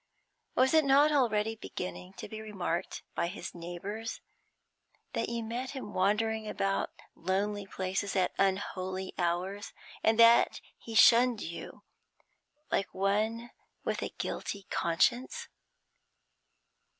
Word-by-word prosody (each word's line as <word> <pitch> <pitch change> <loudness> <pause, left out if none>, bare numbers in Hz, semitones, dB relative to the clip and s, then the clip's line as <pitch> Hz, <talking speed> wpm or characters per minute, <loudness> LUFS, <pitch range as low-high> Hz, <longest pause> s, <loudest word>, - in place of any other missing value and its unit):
Was 260 +3 +4
it 315 -1 +6
not 280 +2 +5
already 225 -6 +2
beginning 180 -3 -6
to - - -8
be 220 0 -7
remarked 190 -5 -3
by 170 - 0
his 175 0 -6
neighbours 180 +6 -5 0.9
that - - -1
you 235 -1 -2
met 240 +4 -3
him 210 -5 -7
wandering 215 +3 +1
about 195 -1 0 0.2
lonely 200 +3 -1
places 190 +1 -2
at 185 -2 +2
unholy 190 -1 -1
hours, 185 +4 -1 0.3
and 220 0 +4
that 230 0 +6 0.2
he 225 - -8
shunned 235 0 +6
you, 170 - -7 0.9
like 195 - 0
one 215 +5 0 0.3
with - - -1
a - - -2
guilty 200 -1 -4
conscience? 235 +10 +1
205 Hz, 115 wpm, -31 LUFS, 185-230 Hz, 0.9 s, it